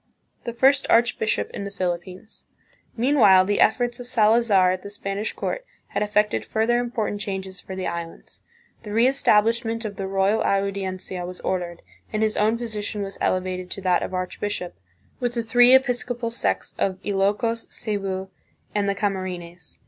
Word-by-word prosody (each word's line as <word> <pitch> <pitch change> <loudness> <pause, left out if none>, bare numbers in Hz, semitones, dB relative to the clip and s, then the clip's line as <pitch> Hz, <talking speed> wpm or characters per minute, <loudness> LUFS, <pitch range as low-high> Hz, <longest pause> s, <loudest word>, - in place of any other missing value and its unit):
The 235 - -3
First 270 +3 +4
Archbishop 230 -2 +2
in - - -5
the 200 - -4
Philippines. 185 +1 -5 0.5
Meanwhile 225 -7 +5
the 205 +1 0
efforts 240 +2 +2
of 245 - -7
Salazar 215 -5 +4
at 185 0 -3
the 200 - -8
Spanish 205 +1 -3
court - - -4 0.3
had - - -2
effected 210 - +1
further 225 - +1
important 230 -4 -2
changes 190 -1 -5
for 190 - -8
the 185 -1 -4
Islands. 170 0 -6 0.4
The 215 - -10
reestab 230 -1 +4
lishment 230 0 -1
of 205 -2 -5
the 195 - -3
Royal 195 +3 +2
Audiencia 190 -2 -1
was 180 +1 -6
ordered, 175 -2 -3 0.3
and 215 0 0
his 215 -1 +1
own 215 +2 +2
position 215 -3 -3
was 195 -1 -7
elevated 185 0 -1
to - - -6
that 180 -2 +2
of - - -4
archbishop, 185 0 -3 0.5
with 245 -1 -2
the 235 - -1
three 245 +3 +6
episcopal 245 -2 0
sees 235 - 0
of 190 -1 0
Ilokos, 205 +4 0
Cebu, 195 -3 -3 0.4
and 205 -1 +1
the 200 - 0
Camarines. 180 -4 -4
205 Hz, 160 wpm, -24 LUFS, 185-230 Hz, 0.5 s, three